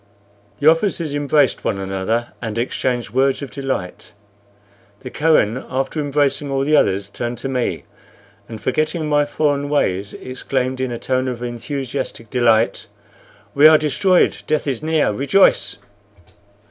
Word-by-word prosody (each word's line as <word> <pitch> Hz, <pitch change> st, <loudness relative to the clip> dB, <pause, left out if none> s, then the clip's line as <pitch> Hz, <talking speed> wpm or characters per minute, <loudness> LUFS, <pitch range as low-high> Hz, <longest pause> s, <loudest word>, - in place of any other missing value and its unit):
The 145 Hz, -, +1 dB
officers 165 Hz, -2 st, +2 dB
embraced 145 Hz, -1 st, +1 dB
one -, -, -1 dB
another 95 Hz, +5 st, -2 dB
and 115 Hz, -2 st, -4 dB
exchanged 120 Hz, 0 st, -2 dB
words 135 Hz, +2 st, +1 dB
of 135 Hz, -, -7 dB
delight. 135 Hz, -10 st, -5 dB, 0.9 s
The 125 Hz, -2 st, -8 dB
Kohen, 130 Hz, -7 st, +2 dB
after 135 Hz, +4 st, -2 dB
embracing 145 Hz, 0 st, 0 dB
all 135 Hz, 0 st, 0 dB
the 150 Hz, +2 st, +2 dB
others, 100 Hz, -8 st, +2 dB
turned 120 Hz, +4 st, -5 dB
to -, -, -4 dB
me, 125 Hz, -2 st, -2 dB, 0.7 s
and, 110 Hz, -2 st, -7 dB
forgetting 155 Hz, +7 st, -1 dB
my 145 Hz, -1 st, +2 dB
foreign 145 Hz, -1 st, -1 dB
ways, 100 Hz, -9 st, -1 dB
exclaimed, 130 Hz, 0 st, -3 dB
in 130 Hz, -, -1 dB
a 120 Hz, -, -3 dB
tone 130 Hz, +2 st, -1 dB
of 125 Hz, -1 st, -4 dB
enthusiastic 125 Hz, 0 st, -5 dB
delight, 115 Hz, -3 st, +2 dB, 0.7 s
"We 145 Hz, +2 st, +7 dB
are 155 Hz, 0 st, +7 dB
destroyed! 180 Hz, +5 st, +2 dB
Death 155 Hz, 0 st, 0 dB
is 135 Hz, -5 st, -2 dB
near! 160 Hz, -4 st, +1 dB
Rejoice!" 140 Hz, -, +2 dB
135 Hz, 140 wpm, -19 LUFS, 120-145 Hz, 0.9 s, We